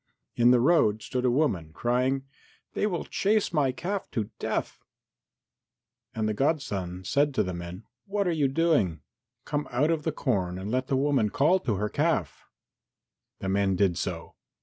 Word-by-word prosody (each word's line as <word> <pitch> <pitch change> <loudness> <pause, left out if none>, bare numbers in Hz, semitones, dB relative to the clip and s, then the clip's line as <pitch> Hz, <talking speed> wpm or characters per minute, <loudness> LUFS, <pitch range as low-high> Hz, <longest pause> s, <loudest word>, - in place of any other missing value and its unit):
In 120 0 +5
the 125 0 +6
road 120 -7 +3
stood 125 -1 -2
a - - +4
woman, 100 - 0
crying, 125 - 0 0.5
"They 210 - +1
will 175 -5 -2
chase 210 -2 +1
my 145 -5 +2
calf 195 +8 -4
to 110 -3 -2
death!" - - -3 1.3
And 110 -1 0
the 110 - 0
godson 100 - -1
said 140 +8 +1
to - - +3
the 90 - -4
men, 85 +3 -7 0.2
"What 200 -1 0
are - - +2
you 150 -4 +2
doing? 135 - +1 0.4
Come 145 0 -2
out 140 +6 +2
of 160 -2 0
the 160 - -1
corn 95 -11 -1
and 95 +3 -5
let 130 +1 0
the 135 - +1
woman 135 -6 +2
call 155 - +3
to 120 - -1
her 105 +2 -1
calf." 145 - -1 0.9
The 95 - -2
men 95 0 +2
did 90 -2 +2
so. - - -4
125 Hz, 170 wpm, -27 LUFS, 100-150 Hz, 1.3 s, the